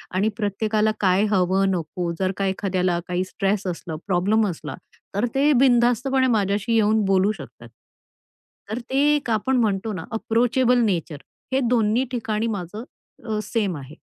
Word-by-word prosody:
आणि 205 Hz, +4 st, +2 dB
प्रत्येकाला 215 Hz, +1 st, 0 dB
काय 190 Hz, 0 st, +3 dB
हवं, 190 Hz, 0 st, +2 dB
नको, 170 Hz, 0 st, -3 dB
जर 190 Hz, 0 st, +1 dB
का 195 Hz, -, 0 dB
एखाद्याला 185 Hz, -2 st, 0 dB
काही 180 Hz, +1 st, -1 dB
स्ट्रेस 195 Hz, +1 st, -1 dB
असलं, 165 Hz, -2 st, -5 dB
प्रॉब्लेम 205 Hz, +4 st, +2 dB
असला, 155 Hz, -6 st, -6 dB, 0.4 s
तर 205 Hz, -, +1 dB
ते 285 Hz, +2 st, +4 dB
बिनधास्तपणे 255 Hz, +1 st, +3 dB
माझ्याशी 200 Hz, +2 st, 0 dB
येऊन 215 Hz, -1 st, +3 dB
बोलू 195 Hz, +1 st, +3 dB
शकतात. 125 Hz, -, -11 dB, 1.0 s
तर 220 Hz, +3 st, -3 dB
ते 265 Hz, -, -1 dB, 0.2 s
एक 285 Hz, -, -3 dB
आपण 230 Hz, +4 st, +1 dB
म्हणतो 210 Hz, 0 st, -1 dB
ना, 170 Hz, -4 st, -5 dB
अप्रोचेबल 245 Hz, +3 st, +2 dB
नेचर, 170 Hz, -7 st, -2 dB, 0.4 s
हे 265 Hz, -, +3 dB
दोन्ही 235 Hz, +1 st, +2 dB
ठिकाणी 225 Hz, -2 st, -2 dB
माझं 205 Hz, +1 st, -5 dB, 0.4 s
अ, 215 Hz, -2 st, -2 dB
सेम 205 Hz, -4 st, -1 dB
आहे. 140 Hz, +3 st, -10 dB
205 Hz, 150 wpm, -23 LUFS, 185-225 Hz, 1.0 s, ते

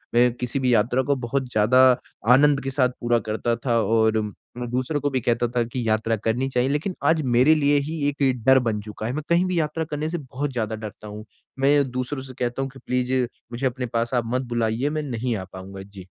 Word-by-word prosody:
मैं 120 Hz, 0 st, +5 dB
किसी 125 Hz, +2 st, -3 dB
भी 125 Hz, -2 st, +2 dB
यात्रा 120 Hz, +5 st, +2 dB
को 140 Hz, +2 st, +1 dB
बहुत 130 Hz, +1 st, -2 dB
ज़्यादा 125 Hz, +5 st, +4 dB, 0.5 s
आनंद 140 Hz, +1 st, +4 dB
के 135 Hz, -, -2 dB
साथ 130 Hz, -2 st, +2 dB
पूरा 120 Hz, 0 st, +2 dB
करता 115 Hz, +2 st, 0 dB
था 115 Hz, -2 st, +2 dB
और 110 Hz, 0 st, +2 dB, 0.4 s
मैं 120 Hz, -1 st, -4 dB
दूसरों 130 Hz, +4 st, -1 dB
को 145 Hz, -, +1 dB
भी 130 Hz, -1 st, 0 dB
कहता 120 Hz, 0 st, +1 dB
था 120 Hz, -, +3 dB
कि 120 Hz, 0 st, -4 dB
यात्रा 110 Hz, +1 st, +1 dB
करनी 120 Hz, +4 st, 0 dB
चाहिए 125 Hz, +1 st, +1 dB
लेकिन 155 Hz, +6 st, -1 dB
आज 160 Hz, -1 st, +3 dB
मेरे 135 Hz, +6 st, +6 dB
लिए 145 Hz, -1 st, +3 dB
ही 160 Hz, -1 st, -4 dB
एक 135 Hz, -5 st, 0 dB
डर 130 Hz, 0 st, +7 dB
बन 110 Hz, -4 st, -1 dB
चुका 105 Hz, +1 st, -7 dB
है। 125 Hz, -, -2 dB
मैं 155 Hz, 0 st, -3 dB
कहीं 170 Hz, +2 st, +3 dB
भी 180 Hz, -2 st, 0 dB
यात्रा 155 Hz, +1 st, -1 dB
करने 150 Hz, +2 st, -2 dB
से 175 Hz, -, -2 dB
बहुत 140 Hz, 0 st, -4 dB
ज़्यादा 110 Hz, -2 st, -2 dB
डरता 105 Hz, 0 st, -9 dB
हूँ, 105 Hz, +1 st, -8 dB, 0.3 s
मैं 140 Hz, 0 st, +3 dB
दूसरों 130 Hz, +2 st, -3 dB
से 130 Hz, -1 st, -10 dB
कहता 120 Hz, +2 st, -1 dB
हूँ 135 Hz, -, -2 dB
कि 135 Hz, -, -14 dB
प्लीज़ 125 Hz, 0 st, 0 dB, 0.4 s
मुझे 120 Hz, +3 st, -3 dB
अपने 125 Hz, 0 st, -3 dB
पास 115 Hz, +2 st, -1 dB
आप 120 Hz, -1 st, +2 dB
मत 130 Hz, -, +1 dB
बुलाइए 115 Hz, +4 st, 0 dB
मैं 155 Hz, 0 st, -2 dB
नहीं 120 Hz, -3 st, -2 dB
आ 95 Hz, -, -5 dB
पाऊँगा। 95 Hz, +1 st, -9 dB
जी। 100 Hz, -2 st, -12 dB
125 Hz, 230 wpm, -23 LUFS, 115-140 Hz, 0.5 s, डर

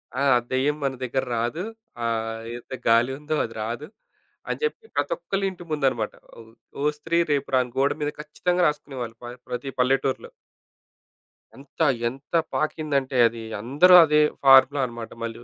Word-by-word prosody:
ఆ! 135 Hz, -, -1 dB, 0.3 s
దెయ్యం 135 Hz, +3 st, +1 dB
మన 135 Hz, -1 st, 0 dB
దెగ్గర 130 Hz, +1 st, -1 dB
రాదు. 120 Hz, +10 st, -2 dB, 0.4 s
ఆహ్, 115 Hz, -1 st, -2 dB, 0.2 s
ఎంత 120 Hz, -, -11 dB
గాలి 115 Hz, +3 st, +4 dB
ఉందో, 155 Hz, +1 st, -2 dB
అది 115 Hz, -, -9 dB
రాదు 120 Hz, +7 st, -5 dB, 0.6 s
అని -, -, -2 dB
జెప్పి 455 Hz, 0 st, -2 dB
ప్రతి -, -, 0 dB
ఒక్కళ్ళ 200 Hz, -, -3 dB
ఇంటి 175 Hz, -1 st, -11 dB
ముందు 150 Hz, -3 st, 0 dB
అనమాట. 115 Hz, -4 st, -4 dB, 0.3 s
ఒ -, -, -9 dB, 0.4 s
ఓ -, -, -2 dB
స్త్రీ 165 Hz, +3 st, -1 dB
రేపు 140 Hz, -1 st, 0 dB
రా! 130 Hz, -, +5 dB
అని 125 Hz, -, -11 dB
గోడ 140 Hz, +1 st, +3 dB
మీద 150 Hz, -, -1 dB
ఖచ్చితంగా 175 Hz, +4 st, -1 dB
రాసుకునేవాళ్ళు 135 Hz, -6 st, -4 dB
ప -, -, -7 dB, 0.2 s
ప్రతి 130 Hz, +3 st, -4 dB
పల్లెటూరిలో. 135 Hz, +1 st, +1 dB, 1.3 s
ఎంత 140 Hz, +4 st, -11 dB, 0.3 s
ఎంత 135 Hz, +6 st, -8 dB, 0.2 s
పాకిందంటే 140 Hz, -4 st, -1 dB
అది 115 Hz, 0 st, -7 dB, 0.2 s
అందరూ 145 Hz, +11 st, +5 dB
అదే 150 Hz, 0 st, +3 dB, 0.2 s
ఫార్ములాన్నమాట 130 Hz, -4 st, +4 dB
మళ్ళీ. 115 Hz, +1 st, -6 dB
135 Hz, 150 wpm, -24 LUFS, 120-150 Hz, 1.3 s, రా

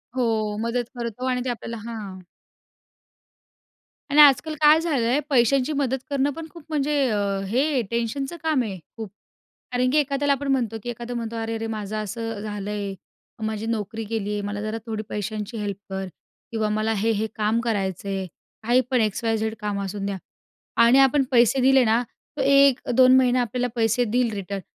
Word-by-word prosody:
हो, 220 Hz, -4 st, 0 dB
मदत 235 Hz, +1 st, -2 dB
करतो 235 Hz, +1 st, -4 dB
आणि 250 Hz, -1 st, 0 dB
ते -, -, -1 dB
आपल्याला 230 Hz, -1 st, -5 dB
हां. 200 Hz, -5 st, -7 dB, 1.9 s
आणि 300 Hz, +1 st, +7 dB
आजकाल 295 Hz, +2 st, +6 dB
काय 305 Hz, +1 st, +7 dB
झालं 280 Hz, -9 st, 0 dB
आहे, 265 Hz, +5 st, +2 dB
पैशांची 265 Hz, +3 st, +3 dB
मदत 265 Hz, -1 st, 0 dB
करणं 280 Hz, 0 st, +1 dB
पण 325 Hz, +1 st, -7 dB
खूप 330 Hz, 0 st, -13 dB
म्हणजे 300 Hz, -1 st, 0 dB, 0.2 s
अ, 210 Hz, -, 0 dB, 0.3 s
हे 265 Hz, +4 st, +1 dB
टेन्शनचं 270 Hz, +7 st, -2 dB
काम 305 Hz, -6 st, +2 dB
आहे 195 Hz, -4 st, -5 dB, 0.2 s
खूप. 220 Hz, -3 st, -6 dB, 0.6 s
कारण 250 Hz, +1 st, +2 dB
की 305 Hz, -, +3 dB
एखाद्याला 280 Hz, 0 st, +1 dB
आपण 280 Hz, +1 st, -2 dB
म्हणतो 235 Hz, -4 st, 0 dB
की 240 Hz, -, -7 dB
एखादा 240 Hz, +1 st, -6 dB
म्हणतो, 230 Hz, -1 st, -4 dB
"अरे-अरे 225 Hz, 0 st, -3 dB
माझं 215 Hz, -1 st, -4 dB
असं 220 Hz, +1 st, -4 dB
झालंय. 205 Hz, -1 st, -4 dB, 0.5 s
माझी 220 Hz, 0 st, -3 dB
नोकरी 225 Hz, 0 st, -3 dB
गेली 210 Hz, -1 st, -3 dB
आहे. 205 Hz, -, -2 dB
मला 205 Hz, 0 st, -4 dB
जरा 215 Hz, +1 st, -3 dB
थोडी 220 Hz, -1 st, -3 dB
पैशांची 210 Hz, +2 st, -4 dB
हेल्प 205 Hz, -2 st, -3 dB
कर 190 Hz, 0 st, -3 dB, 0.5 s
किंवा 220 Hz, -1 st, 0 dB
मला 215 Hz, +1 st, 0 dB
हे 225 Hz, -, +2 dB
हे 220 Hz, -, 0 dB
काम 215 Hz, +2 st, +1 dB
करायचं 200 Hz, -5 st, -2 dB
आहे." 195 Hz, -1 st, -2 dB, 0.4 s
काही 240 Hz, +3 st, +3 dB
पण 250 Hz, -2 st, +3 dB
एक्स 215 Hz, +1 st, -1 dB
वाय 225 Hz, 0 st, +2 dB
झेड 220 Hz, 0 st, -2 dB
काम 205 Hz, -1 st, -2 dB
असून 195 Hz, +1 st, -4 dB
द्या 200 Hz, -1 st, -2 dB, 0.7 s
आणि 240 Hz, +3 st, +6 dB
आपण 270 Hz, +1 st, +5 dB
पैसे 245 Hz, +1 st, +4 dB
दिले 265 Hz, 0 st, +5 dB
ना, 225 Hz, +2 st, +3 dB, 0.4 s
तर -, -, +1 dB
1 275 Hz, -1 st, +5 dB
2 255 Hz, +1 st, +7 dB
महिना 255 Hz, -1 st, +4 dB
आपल्याला 245 Hz, +1 st, -1 dB
पैसे 225 Hz, +2 st, +2 dB
देईल 240 Hz, +1 st, +1 dB
रिटर्न 200 Hz, 0 st, -4 dB
230 Hz, 180 wpm, -24 LUFS, 215-260 Hz, 1.9 s, आणि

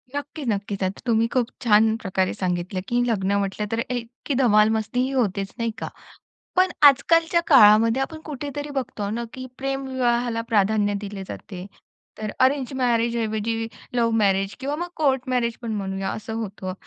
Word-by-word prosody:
नक्की, 285 Hz, +1 st, -5 dB
नक्कीच. 200 Hz, -3 st, -2 dB
आता 190 Hz, +1 st, -3 dB
तुम्ही 230 Hz, -1 st, +3 dB
खूप 250 Hz, -3 st, +2 dB, 0.2 s
छान 220 Hz, -1 st, +4 dB
प्रकारे 190 Hz, -2 st, 0 dB
सांगितलं, 180 Hz, 0 st, -2 dB
की 240 Hz, +2 st, +1 dB
लग्न 200 Hz, -3 st, 0 dB
म्हटलं 200 Hz, +1 st, -2 dB
तर 225 Hz, -, 0 dB
इतकी 245 Hz, +3 st, -4 dB
धमाल 215 Hz, -5 st, +4 dB
मस्तीही 235 Hz, +4 st, 0 dB
होतेच 200 Hz, -7 st, -1 dB
नाही 230 Hz, -1 st, 0 dB
का? -, -, -4 dB, 0.7 s
पण 370 Hz, 0 st, +4 dB, 0.2 s
आजकालच्या 330 Hz, +5 st, +4 dB
काळामध्ये 225 Hz, -1 st, +6 dB
आपण 315 Hz, +3 st, -5 dB
कुठेतरी 290 Hz, 0 st, -5 dB
बघतो 260 Hz, -7 st, -3 dB
ना, 235 Hz, +2 st, -3 dB
की 255 Hz, 0 st, -7 dB
प्रेमविवाहाला 255 Hz, -3 st, -1 dB
प्राधान्य 205 Hz, -1 st, +2 dB
दिले 200 Hz, -1 st, -6 dB
जाते. 185 Hz, -4 st, -8 dB, 0.5 s
तर 215 Hz, -1 st, -3 dB
अरेंज 265 Hz, 0 st, +2 dB
मॅरेजऐवजी 230 Hz, -2 st, 0 dB, 0.3 s
लव्ह 230 Hz, -1 st, +2 dB
मॅरेज 195 Hz, -2 st, +2 dB
किंवा 280 Hz, +2 st, -2 dB
मग 350 Hz, +2 st, -4 dB
कोर्ट 270 Hz, -5 st, +2 dB
मॅरेज 240 Hz, -2 st, 0 dB
पण 230 Hz, -2 st, -3 dB
म्हणूया 195 Hz, -1 st, -3 dB
असं 220 Hz, +1 st, -6 dB
होतं. 190 Hz, -3 st, -5 dB
230 Hz, 155 wpm, -23 LUFS, 205-260 Hz, 0.7 s, काळामध्ये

